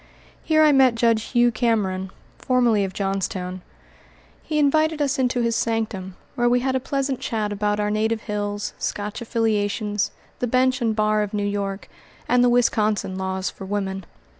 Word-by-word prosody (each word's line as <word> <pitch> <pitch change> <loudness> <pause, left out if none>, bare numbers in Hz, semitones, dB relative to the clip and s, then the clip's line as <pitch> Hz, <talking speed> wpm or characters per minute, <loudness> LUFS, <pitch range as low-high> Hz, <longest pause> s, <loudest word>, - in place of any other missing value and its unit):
Here 310 -1 +4
I 305 - +6
met 265 -4 +5
Judge 230 -1 +2
Hugh 240 -1 +3
Cameron, 210 -5 0 0.3
formerly 240 -5 +2
of 190 - -3
Johnstown. 185 -1 -3 0.8
He 310 - -3
invited 310 +2 +2
us 280 -1 0
into 250 -1 +1
his 230 -1 +1
sanctum, 215 -6 -2 0.2
where 240 0 +2
we 245 0 +3
had 260 +1 0
a - - +2
pleasant 275 0 -2
chat 215 -2 -2
about 205 0 0
our 210 0 0
native 220 +1 0
hills, 205 -1 -3
Scotch 205 +3 -4
affiliations, 210 -2 0 0.3
the 245 - 0
bench 255 +2 +2
and 225 -2 +1
bar 215 0 +2
of 210 0 -3
New 205 -1 -1
York, 200 -1 -3 0.4
and 245 0 +4
the 245 - +5
Wisconsin 215 -5 +1
laws 190 0 -2
for - - -11
women. 195 -1 -3
220 Hz, 165 wpm, -23 LUFS, 205-245 Hz, 0.8 s, I